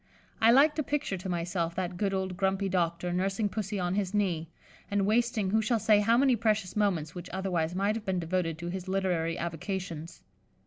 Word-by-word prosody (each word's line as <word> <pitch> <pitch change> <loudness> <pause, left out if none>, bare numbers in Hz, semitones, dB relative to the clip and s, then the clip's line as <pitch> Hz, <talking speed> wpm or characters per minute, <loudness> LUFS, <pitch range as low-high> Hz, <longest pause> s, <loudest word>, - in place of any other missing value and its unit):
I 225 - +6
like 280 +6 +6
to 305 - -1
picture 290 -8 -1
to 185 +1 -6
myself 170 -1 -2
that 180 -1 -2
good 195 +2 0
old 190 -1 -2
grumpy 195 +1 0
doctor 175 -1 0
nursing 195 +3 0
Pussy 205 0 -3
on 180 0 -1
his 200 0 -1
knee, 170 -6 0 0.4
and 200 -1 +1
wasting 220 -2 +1
who 220 +1 +3
shall 230 +2 +1
say 215 -1 +4
how 225 +3 +3
many 265 -1 +4
precious 215 -4 0
moments 180 -8 0
which 180 0 -8
otherwise 180 -3 -1
might 200 +2 +1
have 225 -1 -5
been 190 -1 0
devoted 170 -1 -1
to 170 +1 -5
his 185 +1 -5
literary 180 -4 0
avocations. 170 -1 -5
190 Hz, 195 wpm, -29 LUFS, 175-210 Hz, 0.4 s, I